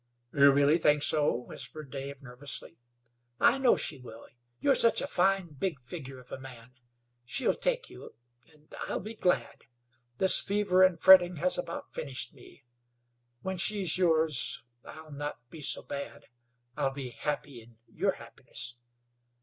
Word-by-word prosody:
"You 140 0 +7
really 145 +4 +4
think 150 -2 +3
so?" 150 -1 +3
whispered 135 +4 -7
Dave, 140 0 -7
nervously. 130 0 -6 0.6
"I 270 - +5
know 260 -3 +5
she 145 - -2
will. 115 -2 -12 0.3
You're 280 - +4
such 230 -3 +4
a - - 0
fine, 195 -6 +1
big 150 +1 -3
figure 135 0 -8
of 125 -1 -15
a - - -6
man. 125 -2 -11 0.5
She'll 130 - 0
take - - -1
you, - - -12 0.4
and 150 0 -22
I'll - - -2
be 215 +4 -7
glad. 160 - -1 0.5
This 190 - +5
fever 200 -2 +1
and 185 -3 +5
fretting 180 -1 +8
has 175 +4 +1
about 170 -1 -5
finished 135 -3 -4
me. 135 +1 -17 0.8
When 190 0 -3
she's 190 -2 +1
yours 160 -6 +1 0.2
I'll 155 0 -11
not 145 -4 -6
be 160 - -10
so - - -1
bad. 140 0 -7 0.5
I'll 135 - +1
be 135 -2 -5
happy 140 -2 -4
in 115 0 -19
your - - 0
happiness. 120 0 -8
150 Hz, 150 wpm, -30 LUFS, 135-185 Hz, 0.8 s, fretting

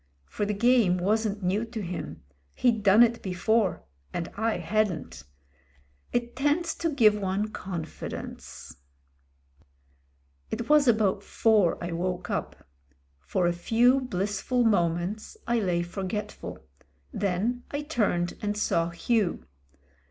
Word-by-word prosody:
For 205 - -3
the 210 - -1
game 230 -4 +4
wasn't 205 +2 0
new 190 +5 +1
to 225 0 -6
him 180 - -6 0.2
— 70 0 -40
he'd 235 -4 +2
done 205 +3 +7
it 235 0 +1
before; 195 +1 0 0.3
and 170 -1 -3
I 220 +1 -1
hadn't. 195 - -1 0.9
It 240 0 -2
tends 295 +5 +1
to 335 - 0
give 235 -8 +5
one 200 +1 -1
confi 170 -6 -6
dence.... - - -9 1.7
It 230 +1 -4
was 300 -2 +5
about 215 -4 +3
four 210 -4 +2
I 170 - -3
woke 180 +1 -3
up. - - -4 0.5
For 175 - -1
a 175 - +2
few 235 +9 +3
blissful 210 +2 -1
moments 190 - 0
I 235 0 +1
lay 180 -4 0
forgetful; 195 +4 -5 0.6
then 205 +6 -1
I 285 +1 -3
turned 205 - 0
and 210 0 -2
saw 170 -5 +1
Hugh. 200 +3 0
210 Hz, 130 wpm, -27 LUFS, 180-235 Hz, 1.7 s, done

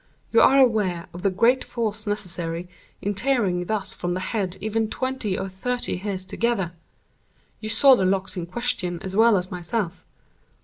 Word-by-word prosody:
You - - +5
are 270 - +6
aware 210 -10 +3
of 175 - -8
the 195 - +2
great 230 +7 +3
force 220 -2 -3
necessary 180 -4 -2 0.4
in 205 - 0
tearing 205 -6 +1
thus 205 0 0
from 175 0 -3
the - - -2
head 190 -1 -2
even 220 +2 -1
twenty 260 -7 -2
or 190 - -3
thirty 240 +4 -2
hairs 190 -1 -4
together. 200 -3 -1 0.9
You 215 - -5
saw 260 +4 +7
the 195 - 0
locks 190 +1 +1
in 175 -2 -4
question 185 -4 -2
as 190 0 -4
well 225 -1 +5
as 180 0 -4
myself. 175 0 -3
200 Hz, 170 wpm, -24 LUFS, 180-230 Hz, 0.9 s, saw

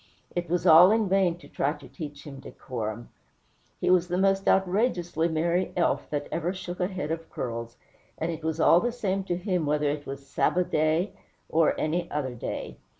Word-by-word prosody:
It 175 -2 -2
was 175 +1 0
all 170 +2 +9
in 220 0 +2
vain 185 -3 +2
to 175 - -15
try 140 +2 -1
to 150 -2 -13
teach 145 -4 -8
him 140 -2 -9
decorum. 115 -4 -6 0.7
He - - +2
was 180 -1 +4
the 180 0 -1
most 195 0 +2
outrageously 180 -4 +2
merry 170 +3 0
elf 175 - +1
that 145 -1 -3
ever 170 +2 -1
shook 180 -1 -7
a 180 - +1
head 180 -6 -4
of 165 0 -4
curls, 115 -1 -5 0.4
and 165 +1 -2
it 160 -1 -7
was 160 0 -2
all 165 +2 +6
the 240 +5 -1
same 195 -5 -2
to 175 -2 -1
him 180 -4 -1
whether 150 0 +1
it 145 0 -5
was 140 0 -7
"Sabba' 180 +5 +1
day" 160 +3 +1 0.4
or 160 -1 +2
any 170 +3 -1
other 140 -4 -2
day. 120 - -5
165 Hz, 195 wpm, -27 LUFS, 150-180 Hz, 0.7 s, all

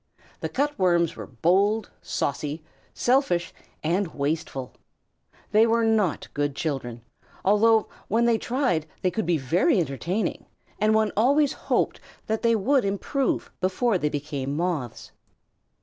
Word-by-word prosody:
The - - -3
Cut 290 0 -1
Worms 175 -3 +2
were - - -8
bold, 195 - +1
saucy, 145 +2 -3 0.3
selfish, 245 -9 +1 0.3
and 175 +5 +1
wasteful. 140 -3 -3 0.8
They 220 +2 +5
were 230 0 +2
not 215 -7 +1
good 145 -1 -1
children, 135 -7 -3 0.4
although 215 +2 +4 0.2
when 230 +3 +2
they 230 -2 +3
tried 240 - 0 0.2
they 185 - +2
could 220 -1 -2
be 175 -2 +3
very 175 - +2
entertaining, 170 +7 -2 0.3
and 215 +1 +3
one 220 -1 +2
always 280 +6 +3
hoped - - -1 0.2
that 220 0 -1
they 230 -1 +3
would 255 +6 +2
improve 200 +7 -1
before 190 +3 +1
they 150 - 0
became 145 -1 -3
Moths. 165 -9 -3
190 Hz, 135 wpm, -25 LUFS, 155-225 Hz, 0.8 s, They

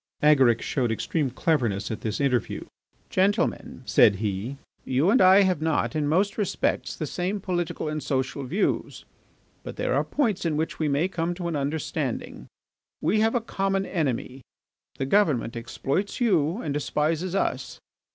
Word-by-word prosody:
Agaric 135 -6 +5
showed 125 -5 0
extreme 140 +5 -1
cleverness 120 -8 0
at 110 - -5
this 110 -2 -3
interview. 130 -4 0 0.5
"Gentlemen," 195 +2 0
said 100 - +5
he, 105 +6 -3 0.3
"you 135 +9 +2
and 255 - +4
I 190 +2 +7
have 185 -5 +1
not, 160 0 0
in 150 -2 0
most 195 +8 +1
respects, 205 - -1
the 155 - -3
same 185 +7 -2
political 175 -4 -2
and 155 0 -3
social 135 0 -2
views, 175 +11 -1 0.6
but - - -8
there - - -1
are - - +2
points 215 -10 0
in 160 -3 0
which 160 +1 -2
we 155 - +1
may 145 +5 +2
come 175 -2 -2
to 175 -1 -4
an 170 - -2
understanding. 145 +2 -3 0.5
We 180 +8 +1
have 225 +3 +2
a 240 - +2
common 195 -3 -1
enemy. 135 -6 -2 0.6
The 135 - -1
government 135 - +2
exploits 135 - -3
you 185 - +1
and 145 - -2
despises 155 +5 -1
us. - - -2
155 Hz, 160 wpm, -26 LUFS, 135-190 Hz, 0.6 s, I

